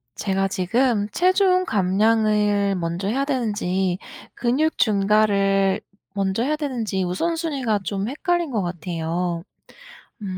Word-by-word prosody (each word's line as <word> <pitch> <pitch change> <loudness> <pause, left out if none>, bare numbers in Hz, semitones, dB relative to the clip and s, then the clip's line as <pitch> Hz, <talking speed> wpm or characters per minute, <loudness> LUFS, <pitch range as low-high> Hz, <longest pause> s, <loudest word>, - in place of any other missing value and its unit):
제가 195 -1 0
지금 210 +3 0
체중 370 - +3
감량을 210 - +2
먼저 175 +2 -2
해야 270 +5 0
되는지 200 -8 -1 0.3
근육 265 +7 0
증가를 200 -2 +2 0.3
먼저 195 +1 -1
해야 300 +3 +1
되는지 240 -10 -2
우선순위가 270 - -1
좀 195 +2 -2
헷갈린 345 +5 -1
것 225 -6 -1
같아요. 170 0 -3 0.8
음. 190 -3 -5
205 Hz, 245 characters per minute, -22 LUFS, 190-255 Hz, 0.8 s, 체중